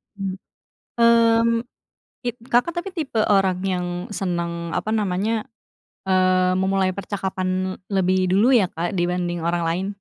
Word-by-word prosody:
Mmm 195 -2 -4 0.6
mmm, 230 -1 +5 0.8
kit 240 -1 -1
Kakak, 245 +8 +2
tapi 390 +3 -3
tipe 275 -10 -1
orang 195 -3 +3
yang 180 -2 -1 0.3
senang, 170 -3 -3
apa 215 - -2
namanya, 210 +1 0 0.6
eee, 185 -1 +3
memulai 190 0 +1
percakapan 185 -1 -3 0.2
lebih 185 -1 +2
dulu 225 +8 +4
ya, 205 - +3
Kak, 170 +2 -3
dibanding 175 -1 -1
orang 170 0 0
lain? 180 +4 -1
190 Hz, 125 wpm, -22 LUFS, 180-215 Hz, 0.8 s, mmm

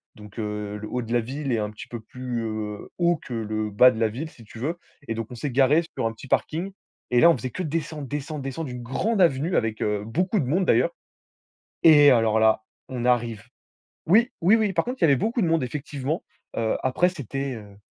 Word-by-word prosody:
Donc, 105 +1 -11
heu, 105 -1 -4
le 105 +1 -7
haut 125 - -2
de 115 0 -5
la 120 - +3
ville 135 +3 -3
est - - +2
un 105 -1 -2
petit 105 - -10
peu 120 -2 -7
plus, 125 0 -5
heu, 110 -2 -5
haut 175 0 +3
que 125 - -8
le 110 -1 -2
bas 125 +5 +7
de 115 - -7
la 110 -1 +2
ville, 135 +9 -5
si 120 - -16
tu 110 +1 -12
veux 155 +8 -2 0.3
et 115 - -1
donc 115 -1 -4
on - - -7
s'est 135 +4 -3
garé 140 +6 +4
sur 130 -4 -1
un 115 - +1
petit 115 +4 -12
parking 170 +8 -1 0.4
et 120 0 +4
là 170 - +8
on 165 - +4
faisait 130 - -4
que 185 - -4
descendre, 155 -2 -3
descendre, 145 +1 -4
descendre 135 +4 -4
d'une 125 -1 -7
grande 195 - 0
avenue 165 +1 +2
avec, 110 -1 0
heu, 105 -1 0
beaucoup 180 - 0
de - - -2
monde, 175 +9 +1
d'ailleurs - - +3 0.9
et 145 -3 +8
alors 115 -3 +3
là, 110 0 +4 0.3
on 125 -2 -3
arrive. 120 -4 +1 0.6
Oui, 225 +8 +5
oui, 185 +6 +5
oui, 215 -3 +2
par 165 -2 +1
contre, 255 +2 -4
il - - +6
y - - +8
avait 140 -3 +5
beaucoup 225 - 0
de 175 - +2
monde 165 -4 +2
effectivement. 145 +3 -3 0.3
Heu, 110 -1 +1
après 130 +7 +3
c'était, 140 - -4
heu 100 -2 -12
130 Hz, 235 wpm, -25 LUFS, 115-160 Hz, 0.9 s, là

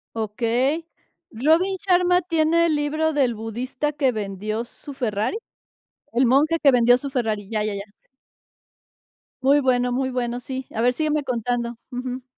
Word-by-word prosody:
Okey. 240 +8 0 0.5
¿Robin 320 - +2
Sharma 360 -1 +3
tiene 335 -1 +2
el 315 - +1
libro 310 +2 0
del 265 -5 +2
budista 245 +6 -3
que 280 -3 +2
vendió 215 +1 -3
su 280 +4 -11
Ferrari? 230 - -1 0.7
El 250 +3 +3
monje 295 +7 +3
que 280 - +6
vendió 245 -1 +5
su 280 +2 -6
Ferrari. 220 -6 -2
Ya, 215 -2 -1
ya, 210 -1 -2
ya. 200 - -4 1.6
Muy 280 +2 +4
bueno, 250 -2 +1
muy 260 +1 0
bueno. 245 -1 -2
Sí. 260 +1 -6
A 225 - -1
ver, 245 +1 +3
sígueme 305 +1 0
contando. 240 -1 -2
Ujú. 250 +1 -5
255 Hz, 150 wpm, -23 LUFS, 235-295 Hz, 1.6 s, que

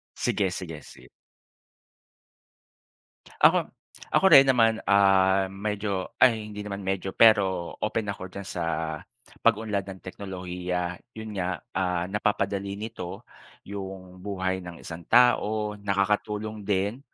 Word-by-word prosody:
Sige, 95 -2 0
sige, 80 -5 -6
sige. - - -15 2.3
Ako - - +5 0.4
ako - - +4
rin 135 - +11
naman 115 -3 +3
ah 95 -1 +4
medyo 100 0 -3
ay 110 -4 +4
hindi 105 - -8
naman 100 -1 -5
medyo 95 0 -2
pero 95 -6 +4
open 105 -1 -1
ako 95 -1 -7
diyan 100 0 -8
sa 85 - -3 0.8
pag-unlad 105 -3 +1
ng 95 -1 -9
teknolohiya. 90 -2 -4 0.2
Yun 110 -1 -7
nga, 90 0 -2
ah, 90 -2 0
napapadali 100 -1 -1
nito 105 -4 -7 0.4
yung 95 -2 -8
buhay 95 -1 -2
ng 90 -2 -10
isang 85 0 -8
tao, 105 -4 +3
nakakatulong 105 +2 -1
din 100 +4 0
100 Hz, 115 wpm, -26 LUFS, 95-105 Hz, 2.3 s, rin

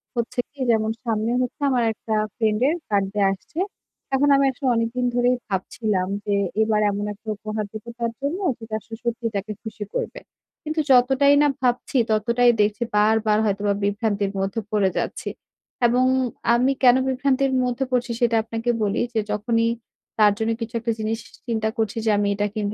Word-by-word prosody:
হচ্ছে 240 +1 -2
কি 285 - -23
যেমন 220 0 +1
সামনে 225 0 0
হচ্ছে 250 +3 -4
আমার 245 -3 +2
একটা 220 0 -5 0.2
friend 215 -1 +1
এর 320 - +2
birthday 200 0 +1
আসছে। 195 - -9 0.6
এখন 285 +2 +3
আমি 275 0 +4
আসলে 260 +1 -4
অনেকদিন 230 +2 0
ধরেই 245 +1 +3
ভাবছিলাম 190 0 -1 0.2
যে 205 -1 +1 0.3
এবার 215 -1 +2
এমন 205 +1 -3
একটা 220 +2 -22
উপহার 215 0 -4
দিব 215 -1 -8 0.2
তার 230 -1 -1
জন্য 305 +7 -2 0.2
যেটা 220 -1 -10
আসলে 225 +1 -10
সত্যিই 235 -1 -2
তাকে 200 +2 -3
খুশি 215 -1 -6
করবে। - - -3 0.4
কিন্তু 310 +1 -2
যতটাই 265 +3 +5
না 295 - +5
ভাবছি 250 +1 0
ততটাই 235 +3 +3
দেখছি 210 +3 +1
বারবার 215 0 +3
হয়তোবা 200 0 +1
বিভ্রান্তির 205 -1 0
মধ্যে 195 +4 -1
পড়ে 200 -3 +3
যাচ্ছি - - -3 0.6
এবং 250 +2 +3 0.5
আমি 255 +3 +3
কেন 245 0 +8
বিভ্রান্তির 265 +1 +1
মধ্যে 250 +2 -1
পড়ছি 245 -1 0
সেটা 235 -1 +3
আপনাকে 230 +1 -3
বলি 205 +1 0
যে 220 - +1
যখনই 230 +2 +1 0.5
তার 210 -1 +7
জন্য 225 +1 0
কিছু 230 +1 -5
একটা 230 0 -1
জিনিস 220 +1 -1 0.3
চিন্তা 220 -1 0
করছি 220 0 -1
যে - - +3
আমি 205 0 +1
এটা 205 +1 0
কিনব, 210 -1 -2
225 Hz, 170 wpm, -23 LUFS, 210-245 Hz, 0.6 s, কেন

